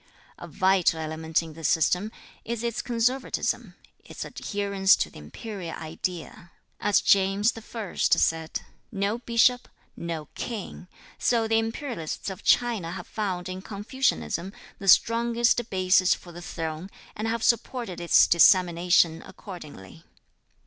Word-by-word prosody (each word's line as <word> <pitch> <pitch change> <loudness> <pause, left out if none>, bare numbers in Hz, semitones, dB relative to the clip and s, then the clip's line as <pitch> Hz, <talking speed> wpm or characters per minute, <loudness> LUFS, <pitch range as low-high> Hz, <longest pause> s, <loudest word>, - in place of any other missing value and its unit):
A - - -8
vital 185 -3 +2
element 160 +1 -1
in 160 -1 -10
this 160 -1 -3
system 180 +6 +1 0.3
is 235 0 -4
its 235 0 -2
conservatism, 245 +2 -1 0.3
its - - -8
adherence 200 -1 +1
to - - -2
the - - -12
imperial 175 - -7
idea. 165 +1 -6 0.3
As 205 - +3
James 200 +3 +3
I 225 -2 -7
said, 160 -1 +1 0.3
"No 205 +2 -1
bishop, 245 +1 +2 0.3
no 165 -2 -5
king," 215 -5 -6 0.3
so 230 -2 +2
the 225 0 +3
imperialists 225 - -4
of 190 - -9
China 225 -9 +2
have 180 -1 -7
found 190 -5 -3
in 185 0 -6
Confucianism 200 - -2 0.3
the 195 - -7
strongest 235 +3 +3
basis 185 0 +3
for 175 - -13
the 175 +1 -10
throne, 165 +1 -5 0.3
and 215 +1 -3
have 230 0 -2
supported 235 -6 0
its 170 - +6
dissemination 170 -1 +4
accordingly. 150 - -11
195 Hz, 130 wpm, -26 LUFS, 170-225 Hz, 0.3 s, its